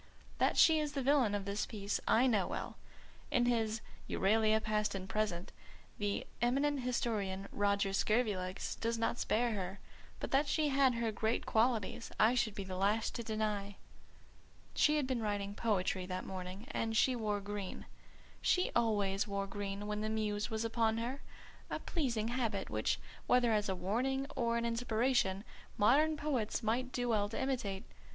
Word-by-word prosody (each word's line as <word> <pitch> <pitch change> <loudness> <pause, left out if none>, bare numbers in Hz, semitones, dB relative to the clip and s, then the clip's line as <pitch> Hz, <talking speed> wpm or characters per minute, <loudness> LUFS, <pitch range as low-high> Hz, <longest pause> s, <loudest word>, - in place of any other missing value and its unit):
That - - +2
she 320 -1 +7
is 300 -1 -2
the 275 - -2
villain 260 -6 +3
of 200 -1 -3
the 200 +1 -1
piece 205 -2 -2
I 240 +3 +5
know 215 -7 +2
well; - - -4 0.5
in 245 -4 +2
his 225 -2 +1 0.3
Euralia 220 +2 +3
Past 215 -1 0
and 190 -1 -5
Present 195 -3 -2 0.5
the 205 -1 -1 0.2
eminent 275 +4 +2
historian, 215 -6 -1
Roger 200 -1 +1
Scurvilegs, 200 -4 0
does 230 0 0
not 230 +1 0
spare 235 +2 +1
her; 195 -1 -4 0.4
but - - -4
that 280 +2 +3
she 305 0 +1
had 270 -2 +4
her 230 -1 0
great 220 +2 -1
qualities 230 -1 +1
I 220 +3 +6
should 225 -4 0
be 200 - -3
the 185 -1 -5
last 205 +4 +1
to - - -3
deny. 210 -2 -2 1.0
She 300 0 +4
had 295 - +1
been 255 -3 -1
writing 205 -2 -2
poetry 190 -4 0
that 185 0 -4
morning, 190 +2 -6
and 225 -5 -1
she 255 +2 +4
wore 210 -3 -1
green. 200 -1 -5 0.6
She 365 - +2
always 205 -4 +1
wore 200 -1 -2
green 200 0 -4
when 210 0 -2
the 215 - -1
Muse 210 -1 -1
was 220 0 -2
upon 225 -1 +1
her: 245 +4 -3 0.5
a - - -2
pleasing 235 -9 -1
habit 230 -5 -1
which, - - 0 0.3
whether 245 -2 +4
as 210 -1 +1
a 190 - 0
warning 255 +9 0
or 235 -1 +1
an 235 - -1
inspiration, 230 -3 +1 0.3
modern 300 +9 +4
poets 255 -7 -1
might 245 +4 0
do 245 -1 -1
well 205 -3 +2
to 225 - -4
imitate. 225 -7 -2
220 Hz, 170 wpm, -34 LUFS, 200-245 Hz, 1.0 s, she